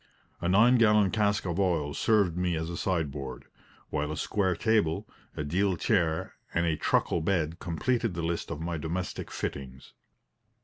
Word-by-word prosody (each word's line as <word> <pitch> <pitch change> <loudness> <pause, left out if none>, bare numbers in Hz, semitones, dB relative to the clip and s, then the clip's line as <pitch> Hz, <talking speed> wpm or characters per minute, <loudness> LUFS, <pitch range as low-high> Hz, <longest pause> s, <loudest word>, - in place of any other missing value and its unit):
A 85 - 0
nine 115 +6 +5
gallon 105 -4 +5
cask 105 -2 +1
of 85 0 -2
oil 80 -7 +1
served 100 -4 +2
me 90 -1 0
as 80 +1 -3
a - - -4
sideboard; 75 -8 -3 0.5
while 75 0 -1
a 75 - -4
square 95 -4 0
table, 105 -8 +1 0.3
a 75 - -1
deal 90 +5 +1
chair 85 -7 0 0.2
and 85 0 +2
a 80 -2 +1
truckle 85 - +1
bed 85 -1 0
completed 110 +4 -1
the 85 - -3
list 85 0 -2
of 80 - -4
my 85 +1 -3
domestic 85 +4 -4
fittings. 65 0 -6
85 Hz, 165 wpm, -29 LUFS, 80-100 Hz, 0.5 s, nine